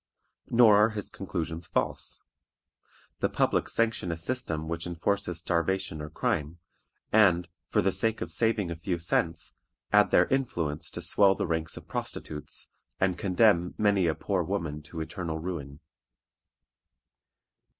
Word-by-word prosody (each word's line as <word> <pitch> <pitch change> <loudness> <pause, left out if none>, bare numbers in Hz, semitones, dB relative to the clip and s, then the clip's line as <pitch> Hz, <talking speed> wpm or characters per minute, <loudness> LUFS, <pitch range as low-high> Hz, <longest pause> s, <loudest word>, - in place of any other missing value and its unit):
Nor 115 -3 +6
are 105 +2 +5
his 105 -2 -5
conclusions 85 -3 -4
false. - - -2 1.0
The - - +1
public - - +1
sanction 115 -6 +1
a 80 - -3
system 85 -6 -2
which 85 +1 -3
enforces 90 +1 -1
starvation 85 -1 -1
or 75 - -6
crime, 85 - -2 0.5
and, 90 -5 +4 0.2
for - - +2
the 95 - +3
sake 110 +3 +2
of - - -5
saving 110 -6 +1
a - - -3
few 85 +2 -2
cents, 80 -1 0 0.4
add - - +6
their - - +5
influence 85 - -1
to 85 - -4
swell 95 +2 +5
the - - -2
ranks 80 -2 -2
of - - -11
prostitutes, 75 -1 -5 0.3
and 95 -1 +2
condemn 90 -2 +2
many 100 -4 +3
a 80 - +1
poor 95 -3 -1
woman 80 -4 -3
to 80 +2 -7
eternal 80 0 -4
ruin. 80 -4 -6
90 Hz, 140 wpm, -28 LUFS, 80-100 Hz, 1.0 s, Nor